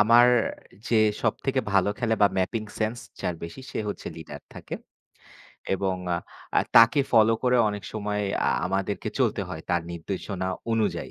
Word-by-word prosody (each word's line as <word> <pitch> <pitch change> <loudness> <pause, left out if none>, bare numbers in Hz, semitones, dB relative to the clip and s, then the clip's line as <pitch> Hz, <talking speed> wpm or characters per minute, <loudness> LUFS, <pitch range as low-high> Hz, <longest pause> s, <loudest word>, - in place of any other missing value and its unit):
আমার 115 +3 +7 0.6
যে 115 - +3 0.3
সবথেকে 130 +4 0
ভালো 100 0 +4
খেলে 115 -2 +1
বা, - - +9
ম্যাপিং 100 +4 0 0.2
সেন্স 110 +2 0 0.2
যার 90 - -1
বেশি 85 +10 -8
সে - - -4
হচ্ছে 105 - -6
লিডার - - -9
থাকে। - - -7 1.0
এবং 95 0 0 0.6
আ - - +7 0.2
তাকে 115 +5 +8
ফলো 110 -1 +6
করে 125 0 +3
অনেক 105 -1 -4
সময় 105 -1 -2 0.2
আ - - +4 0.2
আমাদেরকে 95 +2 -2
চলতে - - +1
হয় 80 - -6
তার 85 -1 +2
নির্দেশনা 95 +2 -4 0.2
অনুযায়ী। 110 -2 0
105 Hz, 150 wpm, -26 LUFS, 95-115 Hz, 1.0 s, বা